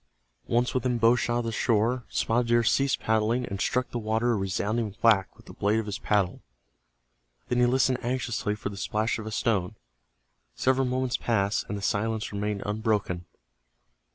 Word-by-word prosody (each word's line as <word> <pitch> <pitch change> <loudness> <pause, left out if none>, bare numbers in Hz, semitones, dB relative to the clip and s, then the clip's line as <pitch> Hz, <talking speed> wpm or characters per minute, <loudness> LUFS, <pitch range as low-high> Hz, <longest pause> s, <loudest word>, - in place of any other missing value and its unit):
Once 120 +1 +1
within 125 -1 0
bow 115 +1 +5
shot 120 -1 0
of 120 - -1
the 115 - -2
shore, 115 +2 +1
Spotted 120 +1 0
Deer 120 0 +3
ceased 135 +3 +2
paddling 110 +3 +1
and 100 -3 -5
struck 125 0 0
the 120 - -2
water 110 +2 0
a - - +2
resounding 100 +2 -1
whack 105 -5 +3
with - - -18
the - - -11
blade 105 +2 +1
of 110 - -1
his 105 -1 -4
paddle. 100 -4 0 1.1
Then 125 - +1
he 125 - +5
listened 130 0 +2
anxiously 120 -4 -1
for 105 - -5
the 100 - -9
splash 110 +3 -1
of 110 - -6
a - - -5
stone. 105 -5 0 0.8
Several 130 0 +2
moments 125 -1 0
passed, 105 -3 0
and 105 - -2
the 100 - -7
silence 110 +2 -1
remained 105 0 -2
unbroken. 105 -4 -1
110 Hz, 180 wpm, -27 LUFS, 105-120 Hz, 1.1 s, bow